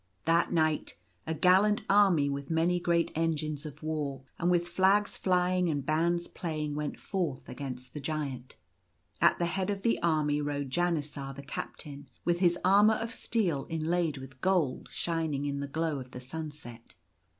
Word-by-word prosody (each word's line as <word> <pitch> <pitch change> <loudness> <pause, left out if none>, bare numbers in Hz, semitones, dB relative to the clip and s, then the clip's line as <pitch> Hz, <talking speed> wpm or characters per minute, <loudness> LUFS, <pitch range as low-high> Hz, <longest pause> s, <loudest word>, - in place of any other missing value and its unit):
That 165 +1 +3
night 155 -2 +1 0.3
a 160 - -1
gallant 190 +6 +4
army, 195 -8 +5
with 140 0 -3
many 170 +2 +2
great 170 -1 +1
engines 155 -2 -1
of 150 +1 -11
war 145 -4 -3 0.2
and 175 - +2
with 175 -1 +2
flags 190 +4 +3
flying 180 -1 +2
and 145 -3 -1
bands 170 +3 +1
playing, 155 -3 -3
went 150 0 -3
forth 175 -9 -3
against 130 -2 -7
the 150 - -5
Giant. 140 -4 -4 0.7
At - - +5
the 175 - 0
head 185 +3 -1
of 200 -1 -2
the 230 - +2
army 150 -3 +2
rode 145 -2 -3
Janisar, 150 -5 -1
the 140 - -8
captain, 140 0 -7 0.2
with 175 0 +2
his 175 -2 +3
armour 205 +3 +6
of 230 +1 -4
steel 175 -12 -1
inlaid 165 -1 0
with 130 -1 -11
gold 180 -9 +1
shining 160 -4 -2
in 140 -1 -2
the 140 - -3
glow 155 0 -1
of 130 -1 -9
the 125 - -8
sunset. 130 - -8
160 Hz, 165 wpm, -30 LUFS, 145-175 Hz, 0.7 s, armour